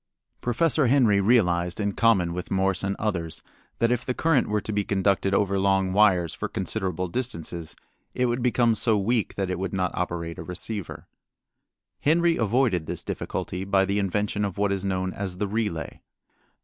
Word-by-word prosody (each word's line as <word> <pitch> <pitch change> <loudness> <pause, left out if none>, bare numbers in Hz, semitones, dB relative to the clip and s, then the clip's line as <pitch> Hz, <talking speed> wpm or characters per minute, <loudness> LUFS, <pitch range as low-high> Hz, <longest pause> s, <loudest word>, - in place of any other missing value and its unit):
Professor 140 +3 +2
Henry 115 -6 +4
realized, 90 -6 +2
in 100 -1 0
common 95 -8 +3
with 90 0 -5
Morse 95 0 +1
and 100 0 -1
others, 85 -7 -3 0.3
that 115 0 +2
if 125 -1 0
the 125 - -2
current 160 -6 +2
were 105 0 0
to 105 - -5
be 105 0 +1
conducted 100 0 +1
over 100 -1 +1
long 95 -1 +2
wires 95 -5 +4
for 105 - -4
considerable 95 -3 -2
distances 85 -7 -5 0.4
it 125 - +1
would 120 +1 0
become 120 -1 +3
so 110 0 +2
weak 110 +2 0
that 95 -2 -2
it 90 - -3
would 95 0 -3
not 90 -2 0
operate 85 -2 -3
a - - -5
receiver. 100 +2 -6 0.9
Henry 170 +2 +3
avoided 110 - +1
this - - -4
difficulty 90 +1 -4
by 95 0 +2
the 100 +1 0
invention 105 +1 -1
of 100 -2 -3
what 100 0 +1
is 100 -1 -1
known 95 -1 -1
as 95 -3 -5
the 105 - -1
relay. 105 -6 -3
100 Hz, 175 wpm, -25 LUFS, 90-115 Hz, 0.9 s, Henry